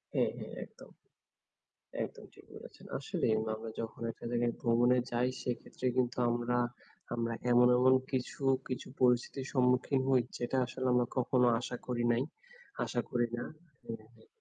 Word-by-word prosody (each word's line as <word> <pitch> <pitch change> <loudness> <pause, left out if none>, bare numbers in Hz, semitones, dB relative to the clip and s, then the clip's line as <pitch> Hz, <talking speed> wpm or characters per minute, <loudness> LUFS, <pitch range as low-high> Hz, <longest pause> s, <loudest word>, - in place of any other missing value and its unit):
হ্যাঁ, - - +3
হ্যাঁ, - - -7
একদম। - - -16 1.1
একদম - - -9
ঠিক - - -17
বলেছেন। - - -12
আসলেই - - 0 0.2
আমরা 110 0 -7
যখন 115 +1 -6
একটা - - -14
জায়গায় 120 0 +1
ভ্রমণে 120 +2 +4
যাই 120 +1 +2
সেইক্ষেত্রে 125 +1 -4
কিন্তু 125 -1 +1
আমরা 120 +1 0 0.6
আমরা 115 -1 -1 0.2
এমন, 125 0 +7
এমন 130 +1 +6 0.2
কিছু, 130 +2 -2 0.3
কিছু 130 - -4
পরিস্থিতির 125 +2 +2
সম্মুখীন 125 +1 +3
হই 130 -2 +5 0.2
যেটা 120 +2 -1
আসলে 130 +1 -4
আমরা 125 -1 +3
কখনো 125 0 +3
আশা 125 - -4
করি 120 -1 -1
নাই। 120 - +2 0.6
আশা 120 - -1
করি 120 -1 +2
না। - - -3 0.4
হ্যাঁ, 110 -1 -7
হ্যাঁ। 110 -1 -21
125 Hz, 150 wpm, -33 LUFS, 120-125 Hz, 1.1 s, এমন